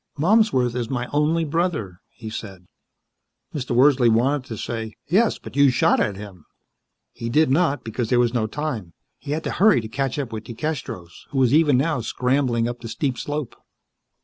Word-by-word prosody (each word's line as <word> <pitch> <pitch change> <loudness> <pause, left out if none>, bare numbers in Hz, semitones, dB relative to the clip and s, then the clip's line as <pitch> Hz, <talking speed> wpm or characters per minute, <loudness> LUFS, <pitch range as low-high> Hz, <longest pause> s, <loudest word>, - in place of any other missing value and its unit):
"Malmsworth 160 - +3
is 120 -2 -2
my 125 -2 -2
only 155 +3 +2
brother," 150 - -2
he 110 -2 -9
said. 95 -5 -8 0.9
Mr. 125 -5 -3
Wordsley 130 -1 +5
wanted 130 +4 +2
to 110 - -6
say, 110 -1 -5
"Yes, 205 +8 +2
but - - -12
you 140 -1 +6
shot 125 - +3
at 100 - 0
him." 95 -4 -10 0.7
He 115 -1 -5
did 150 +2 +3
not, 145 -3 +2
because 115 0 -3
there 125 - +3
was 120 -1 +2
no 115 -3 0
time. 115 - -4 0.3
He - - -11
had 160 +1 -3
to - - -3
hurry 205 - +4
to 110 - -6
catch 135 +4 -2
up 135 -6 -4
with 110 0 -6
DeCastros, 120 - -6
who 140 - -5
was 130 -1 +3
even 150 -4 +5
now 145 -1 0
scrambling 125 0 0
up 120 0 -5
the 115 - -8
steep 130 +3 -2
slope. 145 0 -4
125 Hz, 185 wpm, -23 LUFS, 115-150 Hz, 0.9 s, you